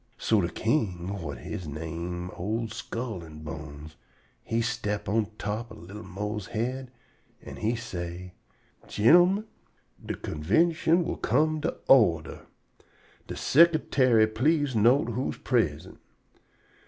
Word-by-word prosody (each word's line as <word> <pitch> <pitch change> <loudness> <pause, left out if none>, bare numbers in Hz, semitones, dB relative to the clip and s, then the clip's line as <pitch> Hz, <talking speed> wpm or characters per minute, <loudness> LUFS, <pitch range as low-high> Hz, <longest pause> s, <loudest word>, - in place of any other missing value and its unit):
So 110 -2 +2
de 85 - -1
king, 95 - -1
whut 85 - -6
he - - -6
name 85 +4 -5
old 110 +4 -3
Skull 115 -4 -5
an' 75 -1 -11
Bones, 75 -1 -8 0.4
he 115 - -1
step 110 -3 -2
on 110 0 +1
top 110 +3 -4
ob 110 - -10
li'l 105 +1 -7
Mose's 105 0 -5
head, 125 +3 -2 0.5
an' - - -9
he 115 +3 0
say: 90 -5 -6 0.5
"Gin'l'min, 175 - +5 0.6
de - - -4
convintion 160 - +2
will - - -3
come 155 0 +1
to 165 - -2
order. 85 -12 +3 0.8
De - - -5
sicretary 140 -7 +4
please 135 +5 +1
note 120 +4 +4
who 125 +4 -2
is - - -5
prisint. 90 - -1
110 Hz, 125 wpm, -27 LUFS, 90-130 Hz, 0.8 s, Gin'l'min